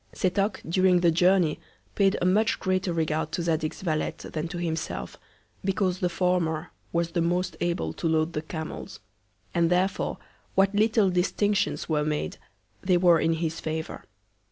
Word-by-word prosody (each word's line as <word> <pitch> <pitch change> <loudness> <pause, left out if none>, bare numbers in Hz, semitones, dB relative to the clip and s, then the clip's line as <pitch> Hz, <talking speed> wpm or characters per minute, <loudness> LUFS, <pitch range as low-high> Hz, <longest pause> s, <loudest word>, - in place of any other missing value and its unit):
Setoc, 195 +3 0
during 180 +1 +3
the 170 -1 +4
Journey, 175 -2 +3 0.3
paid 195 -1 +3
a - - 0
much 210 +4 +2
greater 185 -1 0
Regard 160 -1 -1
to 170 - -1
Zadig's 160 0 -1
Valet, 155 -4 -1 0.2
than 155 +1 -3
to 175 +1 -6
himself; 165 -2 -3 0.5
because 190 -1 0
the 180 - +1
former 175 -3 0 0.2
was 170 0 0
the 170 - 0
most 180 +2 0
able 170 - -1
to 165 - -2
load 160 +1 +1
the 150 - -2
Camels; 160 0 -7 0.5
and 170 -1 +2
therefore 185 +2 0 0.4
what 195 +1 +4
little 215 -1 +3
Distinctions 195 +3 0
were 150 -2 +1
made, 150 - -2 0.4
they 185 -1 +3
were 175 -2 +5
in 165 +1 +2
his 165 0 -2
Favour. 160 0 -4
175 Hz, 155 wpm, -26 LUFS, 160-185 Hz, 0.5 s, were